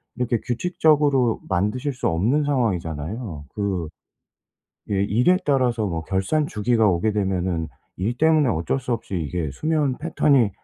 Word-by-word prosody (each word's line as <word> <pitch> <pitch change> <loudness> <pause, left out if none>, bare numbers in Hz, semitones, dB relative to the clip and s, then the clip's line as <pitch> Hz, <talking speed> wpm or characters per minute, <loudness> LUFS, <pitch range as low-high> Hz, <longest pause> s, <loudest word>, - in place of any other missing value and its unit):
이렇게 125 -1 0
규칙적으로 145 -3 +2
만드실 105 +10 0
수 125 - -2
없는 110 - +1
상황이잖아요. 95 - -2
그 95 -5 -2 1.0
예 100 - 0
일에 125 - +3
따라서 125 -6 +1
뭐 85 -4 -2
결산 95 - 0
주기가 110 0 +2
오게 90 +4 +1
되면은 95 -5 -1 0.3
일 110 +6 -2
때문에 155 -2 +4
어쩔 85 - -1
수 125 -1 -5
없이 105 -4 -4
이게 80 -2 -2
수면 150 -4 0
패턴이 145 -7 +3
115 Hz, 305 characters per minute, -23 LUFS, 95-135 Hz, 1.0 s, 때문에